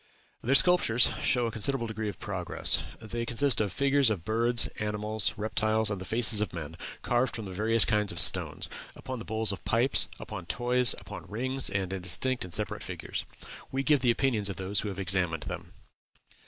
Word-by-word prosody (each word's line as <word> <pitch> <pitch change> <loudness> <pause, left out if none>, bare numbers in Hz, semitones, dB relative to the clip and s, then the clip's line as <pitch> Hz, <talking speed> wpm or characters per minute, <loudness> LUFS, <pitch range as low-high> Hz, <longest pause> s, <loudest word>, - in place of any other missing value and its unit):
Their 130 +4 +1
sculptures 160 -9 +4
show 125 -1 +1
a 115 - -2
considerable 115 +3 -1
degree 110 -1 -4
of 100 - -8
progress. 90 -4 -1 0.2
They 115 +2 -5
consist 120 +1 +3
of 105 -3 -1
figures 140 +3 +2
of 95 -7 -3
birds, 115 +2 0
animals, 105 0 0
reptiles, 110 0 0
and 100 -2 -4
the - - -7
faces 110 0 +4
of 105 - -3
men, 80 -1 -7 0.3
carved 120 0 0
from 105 -5 -7
various 110 +4 +2
kinds 105 -2 0
of - - -7
stones, - - +5 0.3
upon 130 -2 -7
the 115 - -9
bowls 110 -1 -1
of 100 - -7
pipes, 120 +4 +3
upon 90 -2 -8
toys, 120 +2 +3
upon - - -10
rings, 130 +5 0
and 95 -1 -3
in 95 - -5
distinct 125 +9 0
and 90 - -9
separate 105 +4 -2
figures. - - -6 0.5
We 135 +1 -2
give 150 0 +3
the 125 -1 0
opinions 115 -4 +1
of 100 - -5
those 95 +1 -2
who 105 - -3
have 95 - -7
examined 90 -4 -1
them. - - -7
110 Hz, 190 wpm, -28 LUFS, 100-120 Hz, 0.5 s, stones